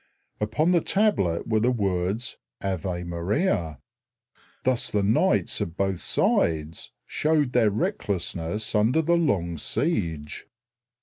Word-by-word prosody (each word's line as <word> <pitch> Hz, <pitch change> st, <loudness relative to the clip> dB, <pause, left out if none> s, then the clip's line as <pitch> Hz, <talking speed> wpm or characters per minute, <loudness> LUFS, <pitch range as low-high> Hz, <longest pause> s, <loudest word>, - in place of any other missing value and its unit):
Upon 110 Hz, +11 st, +1 dB
the 175 Hz, -2 st, +4 dB
tablet 190 Hz, -, +1 dB
were 110 Hz, -1 st, +2 dB
the 120 Hz, +3 st, +2 dB
words, 100 Hz, 0 st, -1 dB, 0.2 s
"Ave 90 Hz, -2 st, -3 dB
Maria." 85 Hz, -, -1 dB, 0.9 s
Thus 130 Hz, -2 st, 0 dB
the 105 Hz, -1 st, 0 dB
knights 105 Hz, +3 st, +2 dB
of 85 Hz, +2 st, -4 dB
both 95 Hz, -2 st, 0 dB
sides 80 Hz, -1 st, 0 dB
showed 150 Hz, -4 st, +1 dB
their 115 Hz, -3 st, +4 dB
recklessness 100 Hz, -2 st, -2 dB
under 115 Hz, +10 st, +3 dB
the 170 Hz, +3 st, +2 dB
long 90 Hz, -, 0 dB
siege. 80 Hz, -, -2 dB
100 Hz, 115 wpm, -25 LUFS, 85-125 Hz, 0.9 s, the